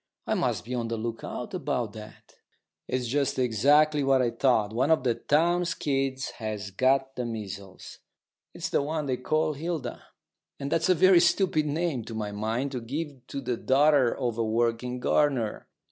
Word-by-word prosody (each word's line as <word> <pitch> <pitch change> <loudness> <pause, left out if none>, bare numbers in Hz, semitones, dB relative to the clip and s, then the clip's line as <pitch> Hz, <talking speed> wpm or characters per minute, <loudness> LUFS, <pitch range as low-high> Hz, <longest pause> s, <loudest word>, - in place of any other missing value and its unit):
I - - 0
must - - -1
be 125 - -5
on 120 -2 -2
the 115 0 -3
lookout 115 - -5
about 140 - -2
that. 110 -1 -12 0.5
It's 125 -1 -1
just 135 +3 0
exactly 145 +5 +3
what 135 -1 +3
I 120 - +1
thought. 115 -3 +2
One 130 +6 +1
of 160 -5 +3 0.2
Townes' 170 +3 +2
kids 135 -2 -1
has 105 -3 -4
got 135 +5 +1
the 125 - -2
measles. 100 -4 -7 0.5
It's - - -5
the - - +2
one 150 +1 -2
they 130 -2 -1
call 155 +4 0
Hilda; 155 -4 -4 0.6
and 140 +1 -4
that's 165 +2 +1
a 185 - +5
very 185 +1 +6
stupid 175 -3 +2
name, 150 -4 -1
to 115 - -7
my 105 -2 -3
mind, 110 +6 -2
to 125 -3 -4
give 135 +1 -6
to 140 - -5
the 125 -2 -2
daughter 140 -1 +4
of 120 -2 -2
a - - +2
working 115 +2 0
gardener. 125 -4 +1
130 Hz, 175 wpm, -27 LUFS, 115-150 Hz, 0.6 s, very